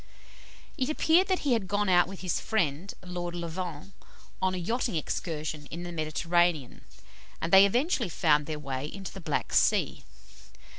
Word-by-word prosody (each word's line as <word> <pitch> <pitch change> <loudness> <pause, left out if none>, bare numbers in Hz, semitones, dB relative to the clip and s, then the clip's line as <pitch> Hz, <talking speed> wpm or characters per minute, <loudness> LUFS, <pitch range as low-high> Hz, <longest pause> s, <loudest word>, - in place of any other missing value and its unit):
It 260 +2 0
appeared 325 +4 +3
that 375 -1 0
he 270 - +3
had 220 -5 0
gone 205 +2 0
out 175 -2 +5
with 195 0 -9
his 185 -2 -1
friend, 180 -4 -1
Lord 175 -1 -4
Levant, 170 0 -5 0.5
on 185 0 +1
a - - -3
yachting 225 +4 -1
excursion 155 -1 -3
in 170 +2 -7
the 175 - -6
Mediterranean, 165 -2 0 0.6
and 165 - -3
they 195 +1 +9
eventually 245 - 0
found 150 -2 +2
their 155 -1 -3
way 135 -1 -4
into 195 -1 -7
the 195 - -9
Black 155 -3 -2
Sea. - - +2
175 Hz, 160 wpm, -28 LUFS, 155-200 Hz, 0.6 s, they